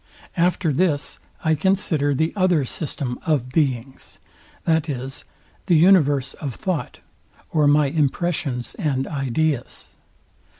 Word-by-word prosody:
After 175 -2 +1
this 150 -1 0 0.3
I 160 - +4
consider 155 -5 +1
the 160 +4 0
other 180 -7 +2
system 130 -3 -3
of 145 -6 0
beings, 130 -3 -2 0.5
viz. 145 -5 -1 0.4
the 175 - +4
universe 145 -6 +4
of 135 -6 -4
thought, 185 -5 -3 0.5
or 155 -3 +3
my 145 +1 +5
impressions 145 -3 -1
and 135 -7 0
ideas. 140 -1 -2
150 Hz, 110 wpm, -22 LUFS, 135-165 Hz, 0.5 s, my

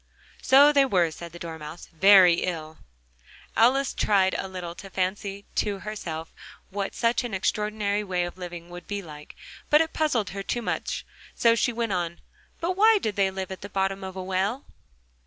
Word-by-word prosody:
"So 280 +3 +6
they 280 -1 +6
were," 180 -10 +2
said 170 +1 -9
the 175 - -10
Dormouse, 160 -1 -8
"very 185 -1 +7
ill." 160 -3 -4 0.8
Alice 260 +4 +3
tried 195 -2 +2
a 195 - -3
little 180 -2 -6
to 195 +3 -11
fancy 195 +2 -3
to 205 -1 0
herself 170 -6 -6 0.4
what 200 0 -3
such 235 +1 +1
an 235 -5 -4
extraordinary 210 +1 -1
way 180 -3 -1
of 175 - -5
living 175 -1 -8
would 175 0 -10
be 205 -1 -4
like, 150 -3 -11 0.3
but 300 - +6
it 320 0 0
puzzled 240 - 0
her 195 +1 -5
too 240 +4 -3
much, - - -3 0.3
so 230 -1 +4
she 230 +1 +1
went 230 -3 -2
on: 175 -1 -2 0.4
"But 340 +2 -1
why 435 +3 +6
did 215 - -2
they 195 -1 +2
live 190 0 -5
at 190 - -7
the 200 - -7
bottom 195 0 -1
of 190 0 -7
a 190 - -5
well?" 190 +8 -1
195 Hz, 185 wpm, -26 LUFS, 175-220 Hz, 0.8 s, very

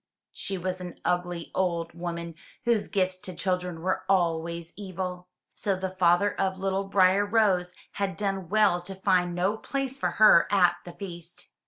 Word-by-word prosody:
She 195 - -3
was 185 +1 -3
an 180 -2 -8
ugly 175 -1 -1
old 170 -3 -1
woman 170 -1 -5 0.3
whose 235 -3 +2
gifts 185 -1 0
to 185 -2 -8
children 180 -2 -2
were 185 +1 0
always 170 -2 0
evil, 180 -2 -5 0.3
so 200 -2 -1
the 190 0 -3
father 185 +2 +3
of 190 0 0
little 195 +1 -1
Briar 195 0 +4
rose 200 -4 +2 0.2
had 200 -1 -3
done 195 -4 -2
well 210 -4 +3
to 190 +2 -8
find 185 -2 +1
no 190 +5 +1
place 270 +2 -3
for - - +1
her 215 -6 +7
at 180 -3 +4
the 175 - -8
feast. 175 -3 -9
185 Hz, 165 wpm, -27 LUFS, 175-195 Hz, 0.3 s, her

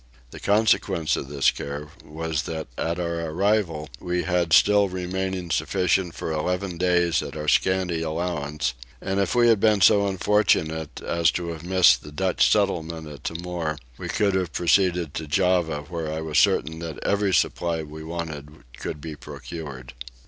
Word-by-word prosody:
The - - -9
consequence 100 -7 +2
of - - -5
this 70 -1 +3
care 75 +1 -6
was 80 0 -3
that 80 -2 -4
at 85 +5 -2
our 85 -1 -2
arrival 90 -3 0
we 90 0 -2
had 90 -2 0
still 100 +3 +5
remaining 95 -1 -3
sufficient 90 -2 +1
for - - -4
eleven 90 +3 -2
days 85 -3 +2
at - - -7
our 75 0 -5
scanty 90 -1 +2
allowance: 75 -4 -2 0.3
and 95 +1 -2
if 100 - 0
we 120 -1 +5
had 115 -3 +5
been 105 0 +4
so 100 +1 +5
unfortunate 90 -6 +1
as 85 -1 +2
to 85 -1 -3
have 80 -1 -6
missed 95 +1 +5
the 75 - -11
Dutch 95 +4 +2
settlement 85 -6 0
at 75 -1 -11
Timor 85 -2 -3 0.2
we - - -5
could 105 -3 +1
have 95 -2 -1
proceeded 90 -3 +2
to 80 - -5
Java 85 -2 +1
where 80 -1 -4
I 80 - -3
was 80 -1 +1
certain 80 +4 +2
that 80 -2 -6
every 100 -1 +1
supply 85 -1 +1
we 80 +1 -9
wanted 80 -2 -7 0.2
could 75 - -5
be 80 -1 -6
procured. 70 -5 -8
85 Hz, 165 wpm, -24 LUFS, 80-95 Hz, 0.3 s, still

